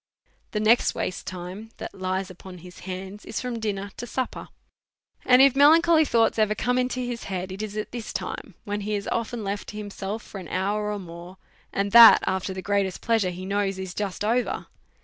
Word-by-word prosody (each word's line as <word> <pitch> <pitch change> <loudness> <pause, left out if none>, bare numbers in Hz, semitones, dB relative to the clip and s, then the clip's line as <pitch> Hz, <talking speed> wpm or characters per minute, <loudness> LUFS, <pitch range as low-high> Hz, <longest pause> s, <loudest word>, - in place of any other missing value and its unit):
The 210 - -2
next 220 +3 +3
waste 185 - -4
time 185 +4 -7
that - - -7
lies 190 0 -3
upon 185 0 -11
his 180 - -12
hands 190 +2 -6
is - - -4
from 245 -2 -4
dinner 200 -2 -3
to 240 - -6
supper; 255 +3 -4 0.8
and 255 +1 +6
if 275 -1 +5
melancholy 315 +3 +6
thoughts 225 -4 +2
ever 215 -1 +2
come 250 +2 0
into 255 0 -1
his 245 -1 -4
head 185 -1 -4
it 190 +2 -6
is 215 -1 -5
at 215 - -4
this 240 -3 -6
time, 200 - -5
when 205 0 -3
he 210 +1 -2
is 200 - -4
often 230 0 -2
left 200 +1 -4
to 210 - -8
himself 205 +1 -5
for 195 - -9
an 180 - -9
hour 210 +4 -1
or 210 - -2
more, 175 0 -10 0.3
and 200 0 -1
that 235 0 +10
af 190 0 -1
ter 190 - -3
the 190 - -6
greatest 200 -2 0
pleasure 225 -5 +1
he 180 +1 -7
knows 195 0 -1
is 190 -1 -5
just 205 0 -3
over. 240 +3 0
205 Hz, 210 wpm, -25 LUFS, 190-230 Hz, 0.8 s, that